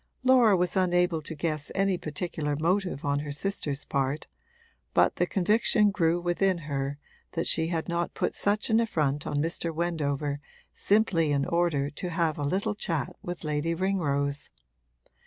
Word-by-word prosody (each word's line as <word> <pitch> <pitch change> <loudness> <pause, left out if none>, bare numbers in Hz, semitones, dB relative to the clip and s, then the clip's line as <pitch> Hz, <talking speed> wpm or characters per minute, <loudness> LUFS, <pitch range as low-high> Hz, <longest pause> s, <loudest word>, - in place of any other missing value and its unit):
Laura 250 -6 +6
was 180 0 0
unable 180 -3 +2
to 160 +2 -4
guess 155 -1 -2
any 195 -1 +2
particular 155 -2 -3
motive 180 0 0
on 145 0 +1
her 145 0 -5
sister's 145 -3 -2
part, 140 +2 -1 0.7
but - - +4
the - - +2
conviction 210 +2 +3
grew 170 -3 +2
within 175 +2 +1
her 140 -3 -3 0.4
that 165 - -1
she 160 0 +1
had 165 -2 -2
not 170 0 -2
put - - -1
such 210 +3 0
an 220 - +5
affront 150 -10 0
on 145 - -1
Mr. 165 +2 -1
Wendover 150 -4 -1 0.3
simply 195 -7 +2
in 140 -1 +1
order 170 -5 +1
to 180 +4 -5
have 165 -3 0
a - - -1
little 195 +9 0
chat 165 -9 -3
with 175 0 -6
Lady 155 +2 -1
Ringrose. 145 -7 0
165 Hz, 155 wpm, -28 LUFS, 145-185 Hz, 0.7 s, Laura